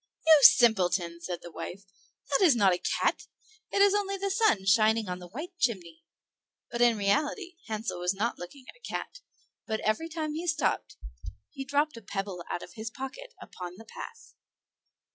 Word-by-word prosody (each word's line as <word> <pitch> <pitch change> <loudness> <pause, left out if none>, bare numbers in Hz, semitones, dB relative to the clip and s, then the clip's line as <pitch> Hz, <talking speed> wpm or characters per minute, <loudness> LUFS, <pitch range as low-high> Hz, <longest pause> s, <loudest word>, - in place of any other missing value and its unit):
"You 315 -1 +8
simpleton!" 180 -9 +5
said 175 0 -5
the 175 - -9
wife, 195 +4 -7 0.5
"that 275 - +3
is 320 -8 +6
not 200 -5 +4
a 180 - -1 0.2
cat; - - 0 0.4
it 400 - +4
is 405 -1 +5
only 395 -1 0
the 395 0 -2
sun 390 - +2
shining 215 +2 +4
on 180 0 -4
the 180 - -10
white 310 - -8
chimney." 175 - -1 0.7
But 240 0 -2
in 240 -2 +5
reality 300 - 0
Hansel 215 -4 -3
was 180 0 +1
not 225 +4 -2
looking 250 +10 -10
at - - -12
a - - -23
cat; - - -5 0.5
but 220 -1 -1
every 320 +10 0
time 310 -2 -3
he 330 +3 -4
stopped 305 -3 -1 0.5
he 270 - -6
dropped 285 0 0
a - - -9
pebble 195 -3 -5
out - - -3
of - - -12
his 225 0 -6
pocket 270 - -8
upon 180 -1 -9
the 225 - -12
path. 460 - -10
230 Hz, 180 wpm, -29 LUFS, 190-310 Hz, 0.7 s, You